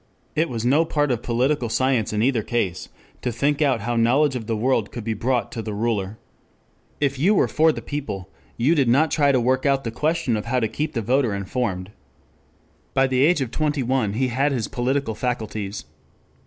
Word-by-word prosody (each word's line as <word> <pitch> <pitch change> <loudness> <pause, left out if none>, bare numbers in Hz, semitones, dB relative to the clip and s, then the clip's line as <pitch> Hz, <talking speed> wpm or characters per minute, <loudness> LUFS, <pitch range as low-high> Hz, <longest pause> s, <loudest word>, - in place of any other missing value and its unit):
It 160 +2 +1
was 115 -2 -3
no 145 +6 +4
part 145 -3 0
of 120 -2 -1
political 125 +1 0
science 130 -2 +1
in 105 0 0
either 125 -3 +2
case 105 -6 -2 0.3
to 125 - -1
think 140 +6 0
out 135 -6 +2
how 120 +3 -2
knowledge 130 +5 +3
of 115 -4 -5
the 115 -2 -1
world 115 -2 +1
could 120 - -6
be 115 0 -1
brought 120 +1 -1
to 115 - -4
the 110 -2 -5
ruler. 105 -2 -1 0.8
If 140 -2 0
you 195 +9 +4
were - - +3
for 160 +1 +3
the - - -7
people 105 -11 -5 0.3
you 130 +8 +3
did 140 -7 +2
not 140 +5 +3
try 145 -3 +3
to 130 - +3
work 130 +2 +1
out 135 -1 +2
the 115 - -3
question 155 -1 0
of 105 - -3
how 125 +2 +1
to 110 - +1
keep 150 +8 -3
the 115 -4 -2
voter 125 -2 +1
informed. 100 -2 -3 1.0
By 135 - +4
the 130 -1 +1
age 160 0 +3
of 125 -3 -2
twenty 150 -2 0
one 125 -5 0
he 130 +3 0
had 135 +4 +1
his 120 -5 -1
political 130 0 -1
faculties. 110 -3 -4
125 Hz, 210 wpm, -23 LUFS, 110-140 Hz, 1.0 s, no